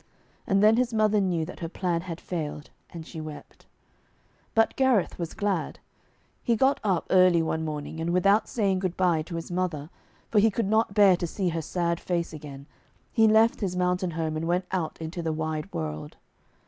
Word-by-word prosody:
And 195 Hz, +1 st, +3 dB
then 215 Hz, +1 st, +6 dB
his 245 Hz, -2 st, 0 dB
mother 215 Hz, -1 st, +3 dB
knew 175 Hz, -4 st, 0 dB
that 180 Hz, -, -10 dB
her 165 Hz, -, -4 dB
plan 175 Hz, -1 st, -1 dB
had 175 Hz, -1 st, -7 dB
failed, 150 Hz, -4 st, -5 dB, 0.2 s
and 165 Hz, -2 st, -9 dB
she 160 Hz, -1 st, -8 dB
wept. 155 Hz, -1 st, -10 dB, 0.9 s
But 225 Hz, 0 st, +3 dB
Gareth 260 Hz, -10 st, +2 dB
was 170 Hz, -1 st, -4 dB
glad. 200 Hz, -6 st, -1 dB, 0.6 s
He 235 Hz, -, +1 dB
got 265 Hz, +5 st, +2 dB
up 190 Hz, -5 st, +1 dB
early 185 Hz, -3 st, +5 dB
one 160 Hz, 0 st, -2 dB
morning, 155 Hz, 0 st, -5 dB
and 165 Hz, +1 st, -2 dB
without 195 Hz, +4 st, +3 dB
saying 200 Hz, -5 st, +1 dB
good 185 Hz, -2 st, -3 dB
bye 175 Hz, -4 st, +2 dB
to 170 Hz, +2 st, -7 dB
his 165 Hz, +1 st, -6 dB
mother, 175 Hz, -4 st, -2 dB, 0.4 s
for 215 Hz, -, +4 dB
he 220 Hz, +2 st, +5 dB
could 220 Hz, +1 st, -1 dB
not 220 Hz, -1 st, +1 dB
bear 200 Hz, -3 st, +6 dB
to 175 Hz, -, -3 dB
see 185 Hz, +2 st, -1 dB
her 165 Hz, -1 st, -2 dB
sad 170 Hz, +1 st, -1 dB
face 170 Hz, -2 st, -2 dB
again, 140 Hz, -2 st, -9 dB, 0.5 s
he 225 Hz, -1 st, +5 dB
left 220 Hz, +2 st, +4 dB
his 185 Hz, -3 st, -1 dB
mountain 180 Hz, 0 st, 0 dB
home, 160 Hz, -1 st, -1 dB
and 160 Hz, +1 st, -2 dB
went 180 Hz, +2 st, +1 dB
out 180 Hz, -4 st, -2 dB
into 165 Hz, +2 st, -5 dB
the 165 Hz, -1 st, -1 dB
wide 155 Hz, +2 st, -3 dB
world. 75 Hz, -1 st, -5 dB
180 Hz, 195 wpm, -26 LUFS, 160-200 Hz, 0.9 s, then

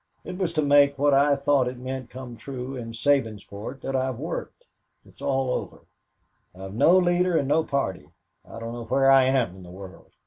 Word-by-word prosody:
It 180 Hz, -, -7 dB
was 180 Hz, -3 st, 0 dB
to 155 Hz, -2 st, +1 dB
make, 140 Hz, 0 st, +4 dB
what 145 Hz, +1 st, +3 dB
I 140 Hz, +1 st, +4 dB
thought 140 Hz, -2 st, +2 dB
it 125 Hz, 0 st, -5 dB
meant 130 Hz, 0 st, -6 dB
come 125 Hz, -2 st, -9 dB
true, 130 Hz, +1 st, -7 dB
in 115 Hz, -2 st, -6 dB
Sabinsport 115 Hz, -1 st, -2 dB
that 135 Hz, -, -3 dB
I've 130 Hz, -2 st, -1 dB
worked. 165 Hz, -, -6 dB, 0.4 s
It's -, -, -20 dB
all 135 Hz, -2 st, 0 dB
over. -, -, -5 dB, 0.7 s
I've 95 Hz, +1 st, -9 dB
no 170 Hz, -, +5 dB
leader 180 Hz, -1 st, +2 dB
and 140 Hz, -, 0 dB
no 155 Hz, +3 st, +2 dB
party. 135 Hz, -, -3 dB, 0.3 s
I -, -, -11 dB
don't 115 Hz, 0 st, -6 dB
know 120 Hz, -1 st, -7 dB
where 135 Hz, +4 st, +3 dB
I 135 Hz, -1 st, +6 dB
am 125 Hz, -9 st, +1 dB
in -, -, -12 dB
the 90 Hz, -, -12 dB
world. 95 Hz, +1 st, -12 dB
130 Hz, 200 wpm, -25 LUFS, 115-145 Hz, 0.7 s, I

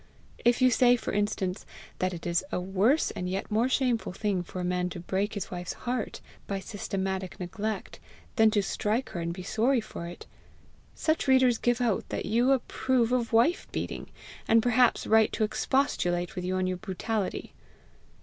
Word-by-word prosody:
If 240 Hz, +2 st, +3 dB
you 255 Hz, -, +6 dB
say, 245 Hz, 0 st, +5 dB
for 240 Hz, -, -4 dB
instance, 200 Hz, -3 st, -1 dB, 0.4 s
that 185 Hz, 0 st, +1 dB
it 170 Hz, -2 st, -7 dB
is 170 Hz, +1 st, +1 dB
a -, -, 0 dB
worse 195 Hz, -, +2 dB
and 180 Hz, -, -4 dB
yet 195 Hz, +3 st, -3 dB
more 225 Hz, +4 st, +2 dB
shameful 250 Hz, -7 st, 0 dB
thing 195 Hz, -2 st, -1 dB
for 180 Hz, +1 st, -7 dB
a -, -, -2 dB
man 180 Hz, 0 st, 0 dB
to 175 Hz, -, -7 dB
break 195 Hz, +5 st, -2 dB
his 205 Hz, -, -4 dB
wife's 180 Hz, -1 st, -4 dB
heart 245 Hz, -1 st, -4 dB, 0.3 s
by 195 Hz, -1 st, -2 dB
systematic 190 Hz, -2 st, -4 dB
neglect, 205 Hz, +3 st, -4 dB, 0.4 s
than 220 Hz, -3 st, +6 dB
to 210 Hz, -2 st, +1 dB
strike 215 Hz, +6 st, -1 dB
her 175 Hz, -, -5 dB
and 170 Hz, 0 st, -2 dB
be 180 Hz, +1 st, -7 dB
sorry 235 Hz, +7 st, +2 dB
for 190 Hz, -6 st, -7 dB
it, 175 Hz, -, -9 dB, 0.7 s
such 315 Hz, -2 st, 0 dB
readers 260 Hz, -3 st, +5 dB
give 245 Hz, 0 st, +1 dB
out 230 Hz, -5 st, 0 dB
that -, -, -3 dB
you 240 Hz, +5 st, +3 dB
approve 255 Hz, -2 st, +1 dB
of 245 Hz, -2 st, 0 dB
wife 235 Hz, +10 st, +3 dB
beating, -, -, -4 dB, 0.4 s
and 225 Hz, 0 st, +5 dB
perhaps 245 Hz, 0 st, +3 dB
write 220 Hz, 0 st, +4 dB
to -, -, 0 dB
expostulate 180 Hz, -7 st, 0 dB
with 180 Hz, -1 st, -4 dB
you 185 Hz, +1 st, -1 dB
on 185 Hz, 0 st, +1 dB
your 185 Hz, 0 st, -1 dB
brutality. 205 Hz, +1 st, -3 dB
210 Hz, 180 wpm, -28 LUFS, 185-245 Hz, 0.7 s, you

